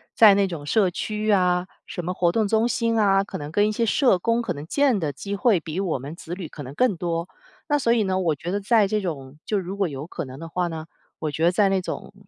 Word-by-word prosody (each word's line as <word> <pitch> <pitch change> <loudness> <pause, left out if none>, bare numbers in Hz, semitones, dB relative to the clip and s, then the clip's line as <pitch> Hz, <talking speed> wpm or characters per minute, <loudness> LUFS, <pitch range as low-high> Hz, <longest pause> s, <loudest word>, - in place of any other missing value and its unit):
在 210 -3 +8
那 200 -1 +3
种 165 -5 -6
社 195 +5 +3
区 210 +4 -3
呀 180 -3 +2 0.2
什 175 - -6
么 180 - -1
活 175 -2 +2
动 220 +2 +1
中 220 +2 +2
心 230 -2 0
啊， 195 -2 +4
可 - - -6
能 145 0 -7
跟 205 +5 +3
一 - - -1
些 230 +2 +1
社 240 -1 +3
工 230 +5 +1
可 230 -6 -2
能 145 -1 -8
见 275 - +2
的 150 -3 -1
机 200 +8 -5
会 210 -2 +3
比 160 +2 -5
我 175 -8 -1
们 140 +5 -7
子 170 0 -8
女 180 -3 -6
可 145 - -9
能 130 +1 -8
更 250 -1 +2
多。 170 0 -2 0.4
那 295 - +2
所 235 -4 +2
以 230 -2 +3
呢， 190 -1 0
我 165 -4 +1
觉 165 +5 -5
得 205 +1 -1
在 210 0 +3
这 210 +1 0
种 145 -6 -5
就 210 - 0
如 190 +1 -5
果 195 -4 +1
有 140 +1 -6
可 - - -5
能 130 +1 -10
的 165 - -7
话 180 +1 -1
呢， 160 -2 -6 0.3
我 155 -2 -2
觉 155 +3 -3
得 175 - +5
在 200 +2 +3
那 195 -1 +1
种， - - -6
185 Hz, 295 characters per minute, -24 LUFS, 165-210 Hz, 0.4 s, 在